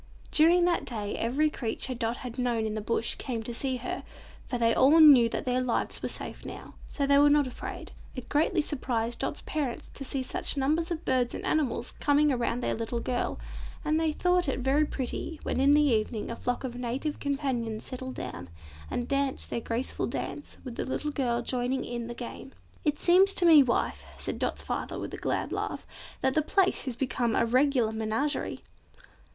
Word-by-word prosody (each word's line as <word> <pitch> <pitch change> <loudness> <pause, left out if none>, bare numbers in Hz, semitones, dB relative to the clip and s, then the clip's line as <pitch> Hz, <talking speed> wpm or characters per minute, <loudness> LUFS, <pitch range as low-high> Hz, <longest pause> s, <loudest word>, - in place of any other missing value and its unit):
During 345 +3 +5
that 350 -1 +1
day 210 -4 -4
every 290 +7 +1
creature 250 +1 -2
Dot 235 0 -2
had 250 0 -7
known 240 -3 0
in 215 - -2
the 215 - -3
Bush 230 +2 +1
came 235 -4 -3
to 240 - -5
see 260 +2 -1
her, 245 - -4 0.5
for 245 - -2
they 230 -1 +3
all 290 +8 +6
knew 275 -7 +8
that - - -3
their 250 0 +1
lives 250 -2 -1
were - - -2
safe - - -5
now, - - -8 0.2
so 280 - -1
they 280 0 +5
were 290 0 +6
not 290 -1 +4
afraid. 255 - -7 0.2
It 255 - -7
greatly 320 +3 +2
surprised 240 -6 -2
Dot's - - -3
parents 290 -6 -3
to 275 - -6
see 265 0 -2
such 270 - -1
numbers 310 +5 +1
of 340 -1 -4
birds 250 -2 +1
and - - -5
animals 255 -6 0
coming 290 0 +3
around 245 -1 -1
their - - 0
little 230 +1 -3
girl, 245 +1 -2 0.5
and 310 +1 +2
they 320 -1 +1
thought 360 +2 +1
it - - -1
very 275 +4 +3
pretty 285 +4 -4
when - - -1
in 280 +2 +5
the 300 - +5
evening 220 -4 0
a - - -4
flock 245 +2 -2
of 255 -2 -4
Native 250 +5 -3
Companions 260 -6 -2
settled 260 0 -6
down, 90 +1 -6 0.4
and 245 - -2
danced 275 -1 -1
their 235 - -1
graceful 235 +3 -2
dance 295 - -5
with 245 -3 -7
the - - -1
little 295 +3 -2
girl 240 -4 0
joining 250 +1 -1
in 240 -1 -4
the 240 - -6
game. 250 +2 -8 0.3
"It 295 -2 +1
seems 380 +3 +5
to 355 - +3
me, 320 -4 +9
wife," 240 -3 0
said - - -4
Dot's - - -1
father - - -3
with - - -5
a - - -4
glad - - -2
laugh, - - -3 0.4
"that 265 - +2
the 310 - +3
place 380 +4 +2
has 255 -3 -2
become 245 -3 0
a - - +3
regular 255 -1 +3
menagerie!" 220 +7 -1
260 Hz, 200 wpm, -28 LUFS, 235-295 Hz, 0.5 s, me